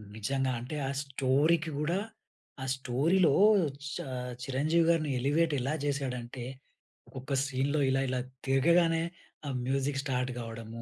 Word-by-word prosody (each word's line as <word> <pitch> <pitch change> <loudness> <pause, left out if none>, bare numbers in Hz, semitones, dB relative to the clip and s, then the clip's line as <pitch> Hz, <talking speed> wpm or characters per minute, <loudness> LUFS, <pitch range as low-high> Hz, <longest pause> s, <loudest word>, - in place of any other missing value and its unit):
నిజంగా 135 +4 -1
అంటే, 125 +6 -6
ఆ - - -1
స్టోరీకి 145 +4 +2
గూడా 170 +5 0 0.6
ఆ - - -3
స్టోరీలో 145 +7 +2 0.2
ఆహ్, 180 -7 +3 0.2
చ - - -5 0.5
చిరంజీవి 155 +6 +2
గారిని 160 -3 +2
ఎలివేట్ 150 +4 +2
ఎలా 135 +4 -1
చేసాడంటే, 130 -3 -3 0.8
ఒక 140 +2 -5
సీన్‌లో 140 +2 0
ఇలా, 135 0 +2
ఇలా 130 0 0 0.3
తిరగగానే 165 +5 +4 0.4
ఆ - - -2 0.2
మ్యూజిక్ 135 +1 0
స్టార్ట్ 125 -3 -1
గావడము, 115 0 -7
135 Hz, 130 wpm, -30 LUFS, 130-155 Hz, 0.8 s, తిరగగానే